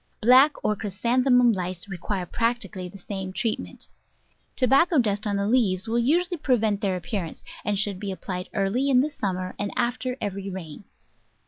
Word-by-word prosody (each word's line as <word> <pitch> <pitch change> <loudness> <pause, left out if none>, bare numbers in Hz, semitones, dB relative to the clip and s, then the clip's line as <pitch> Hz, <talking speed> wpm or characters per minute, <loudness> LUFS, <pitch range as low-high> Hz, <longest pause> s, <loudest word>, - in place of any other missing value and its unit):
Black 255 +6 +6
or 210 - +2
Chrysanthemum 240 +5 +3
Lice 185 -2 -4
require 190 0 -3
practically 230 -4 -2
the 200 - -12
same 190 -1 -5
treatment. 220 +3 -3 0.7
Tobacco 275 +6 +4
dust 210 -4 +1
on 205 - 0
the 200 0 0
leaves 215 -5 +2
will 230 +1 +1
usually 345 +8 +2
prevent 225 -8 +1
their 195 -3 0
appearance, 175 0 -5 0.2
and 205 -1 0
should 200 -2 0
be 200 -1 -3
ap 190 - -8
plied 180 -1 -4
early 215 +7 +1
in 255 -2 +5
the 300 +3 -1
summer 185 -6 -3
and 205 0 -2
after 250 +1 -1
every 200 -1 -4
rain. 185 -1 -8
210 Hz, 165 wpm, -25 LUFS, 190-250 Hz, 0.7 s, Black